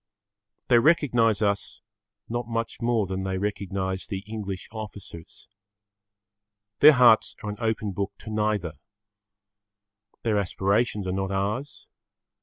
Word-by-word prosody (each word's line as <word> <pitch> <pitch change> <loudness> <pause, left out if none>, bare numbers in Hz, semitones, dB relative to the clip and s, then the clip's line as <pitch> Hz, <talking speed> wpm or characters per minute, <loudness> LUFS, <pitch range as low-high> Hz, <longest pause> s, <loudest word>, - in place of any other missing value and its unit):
They 120 -2 +6
recognise 120 -7 +3
us 100 0 -1 0.5
not 120 0 -3
much 115 0 -3
more 115 -3 +1
than 95 0 -3
they 95 0 -2
recognise 95 -1 -3
the 100 -3 -5
English 100 -3 -6
officers. 105 -6 -9 1.3
Their 150 +1 +9
hearts 125 -4 +5
are 105 - -3
an 105 - -7
open 110 -3 -1
book 100 +1 -3
to 110 - -8
neither. 105 -8 -1 1.4
Their 110 -3 +2
aspirations 100 +2 0
are 95 - -2
not 95 +1 -2
ours. 105 +8 -3
105 Hz, 120 wpm, -26 LUFS, 95-115 Hz, 1.4 s, Their